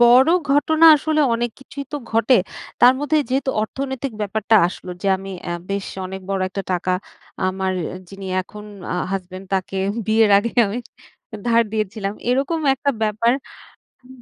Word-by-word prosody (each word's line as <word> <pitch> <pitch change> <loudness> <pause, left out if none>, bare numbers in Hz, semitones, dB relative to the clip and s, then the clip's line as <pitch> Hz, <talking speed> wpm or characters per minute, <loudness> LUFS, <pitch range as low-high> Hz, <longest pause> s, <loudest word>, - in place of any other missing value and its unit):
বড় 250 +5 +7 0.2
ঘটনা 315 +3 +3
আসলে 310 +1 0
অনেক 240 +1 -1
কিছুই 280 +1 -8
তো - - -1
ঘটে। 230 +3 +3 0.5
তার 245 +1 +8
মধ্যে 300 +1 +2
যেহেতু 265 +1 0
অর্থনৈতিক 265 +2 -4
ব্যাপারটা 215 +2 +2
আসলো 180 - -9
যে - - -2
আমি 195 +1 -8 0.2
এ - - -2 0.2
বেশ 200 0 -2 0.2
অনেক 190 +1 -7
বড় 195 -1 0
একটা 195 +1 -4
টাকা 180 +1 0 0.6
আমার 190 0 -1 0.4
যিনি 195 -1 -9 0.2
এখন 210 +3 -11 0.3
অ - - -1 0.2
হাসব্যান্ড 185 0 -5
তাকে 190 0 -2 0.3
বিয়ের 220 -1 +4
আগে 230 +3 -2 0.2
আমি 205 +4 -3 0.7
ধার 230 0 +4
দিয়েছিলাম 210 -1 -2 0.2
এরকম 275 +6 0
একটা 280 +2 0
ব্যাপার, 220 +2 +2 0.7
হু 250 - -19
220 Hz, 150 wpm, -21 LUFS, 195-265 Hz, 0.7 s, তার